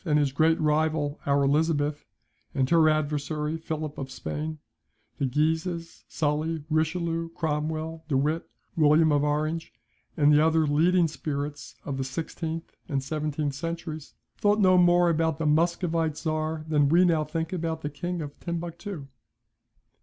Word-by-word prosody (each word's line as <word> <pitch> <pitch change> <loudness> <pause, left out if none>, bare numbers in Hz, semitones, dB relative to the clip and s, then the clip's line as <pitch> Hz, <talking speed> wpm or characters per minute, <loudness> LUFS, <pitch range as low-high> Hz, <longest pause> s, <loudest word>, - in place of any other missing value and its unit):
and 155 -5 +2
his 145 -2 +2
great 160 +4 +3
rival 155 -1 +1
our 140 0 +3
Elizabeth 145 0 +1 0.5
and 130 -2 +2
her 165 -2 +6
adversary 150 0 -1
Philip 155 -2 -5
of 135 -1 -5
Spain, 155 +4 -4 0.6
the 140 - +1
Guises, 160 +5 -1
Sully, 155 +1 -1
Richelieu, 165 +1 0
Cromwell, 160 +1 -2
De 140 -4 +1
Witt, 155 +4 0 0.3
William 155 0 +5
of 145 -1 +3
Orange, 155 +2 -1 0.5
and 150 -1 +5
the 150 +1 +5
other 160 0 +3
leading 165 +4 +3
spirits 145 -1 -5
of 140 -2 -3
the 135 - -1
sixteenth 160 +4 -5
and 135 -3 -1
seventeenth 150 0 -2
centuries, 160 0 -5 0.2
thought 205 +1 +3
no 185 -2 +5
more 175 0 +5
about 160 -1 +1
the 160 - -2
Muscovite 165 0 +1
Czar 155 -1 -2
than 145 -2 +3
we 175 +4 +5
now 165 -3 +3
think 160 +3 -3
about 165 -2 -2
the 145 - -3
King 175 +3 -4
of 145 - -6
Timbuctoo. 170 -1 -5
155 Hz, 145 wpm, -27 LUFS, 150-165 Hz, 0.6 s, her